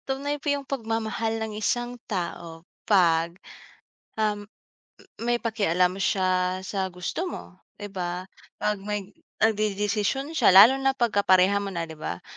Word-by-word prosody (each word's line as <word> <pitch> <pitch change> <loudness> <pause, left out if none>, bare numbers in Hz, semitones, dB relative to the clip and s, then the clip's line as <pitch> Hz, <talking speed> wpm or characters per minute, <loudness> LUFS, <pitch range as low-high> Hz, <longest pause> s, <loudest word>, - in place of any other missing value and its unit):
Tunay 280 +2 -2
po 290 - -2
yung 285 -1 -1
pagmamahal 225 -3 -2
ng 220 -1 -4
isang 240 +3 -1 0.2
tao 170 -4 -5 0.2
pag, 170 -3 +3 0.8
um, 210 -1 -1 0.7
may 240 +1 -1
pakialam 185 -5 +1
siya 185 -1 +1
sa 190 0 -2
gusto 180 - -3
mo, 190 - -8 0.2
di 205 0 -8
ba? 180 -2 -4 0.4
Pag 210 -1 +1
may 205 0 -4 0.3
nag-dedesisyon 215 +5 0
siya 315 - +4
lalo 230 +8 +9
na 270 0 +1
pag 240 -3 +1
kapareha 200 -1 +4
mo 200 -1 -5
na, 165 -1 -3
di 160 - -10
ba? 90 - -5
205 Hz, 140 wpm, -26 LUFS, 185-230 Hz, 0.8 s, lalo